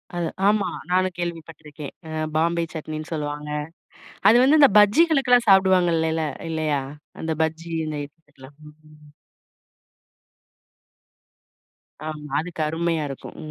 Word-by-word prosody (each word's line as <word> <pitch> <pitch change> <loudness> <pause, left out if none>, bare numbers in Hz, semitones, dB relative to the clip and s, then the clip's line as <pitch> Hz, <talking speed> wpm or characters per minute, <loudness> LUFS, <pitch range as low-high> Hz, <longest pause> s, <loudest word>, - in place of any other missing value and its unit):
அது 170 -1 -1 0.2
ஆமா. 205 -1 +2 0.2
நானும் 185 0 +2
கேள்விபட்டுருக்கேன். 160 -4 -7
அ - - -8 0.3
பாம்பே 170 +1 +1
சட்னின்னு 155 +1 -6
சொல்வாங்க. 150 -1 -4 0.8
அது 230 - +6
வந்து 300 +3 +5
அந்த 280 - +8
பஜ்ஜிகளுக்கெல்லாம் 250 0 +4
சாப்டுவாங்க 190 -2 +5
இல்லல்ல? 160 0 0 0.2
இல்லையா? 155 -3 -1 0.4
அந்த 160 0 -3
பஜ்ஜி 160 +1 -4 0.2
இந்த 155 -1 -4
இதுகெல்லாம். 145 -2 -19
ம். 150 -1 -18 3.0
ஆமா. 150 -2 -7
அதுக்கு 165 -1 -5
அருமையா 165 0 -1
இருக்கும். 135 - -9
160 Hz, 105 wpm, -23 LUFS, 150-185 Hz, 3.0 s, அந்த